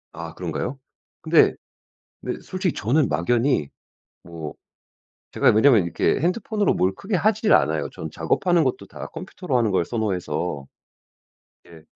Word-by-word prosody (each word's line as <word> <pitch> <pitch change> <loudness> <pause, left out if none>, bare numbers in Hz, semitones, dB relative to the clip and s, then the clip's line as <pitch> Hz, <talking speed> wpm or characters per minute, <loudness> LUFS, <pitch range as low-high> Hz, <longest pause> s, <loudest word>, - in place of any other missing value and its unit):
아 85 0 -7
그런가요? 90 - -4 0.4
근데 - - +4 0.7
네. - - -3
솔직히 185 -2 -2
저는 135 - +1
막연히 85 - +1 0.5
뭐 80 -3 -7 0.8
제가 - - +3
왜냐하면 110 -2 +5
이렇게 85 - 0
핸드폰으로 200 +5 0
뭘 95 +1 +1
크게 195 - -3
하질 215 +4 +2
않아요. - - +2
저는 - - -7
작업하는 175 -3 +1
것도 130 +1 -2
다 - - -8
컴퓨터로 180 -7 -4
하는 115 -4 +1
걸 85 -3 +1
선호해서. 90 - -2 1.0
예. 85 -2 -14
120 Hz, 300 characters per minute, -23 LUFS, -, 1.0 s, 왜냐하면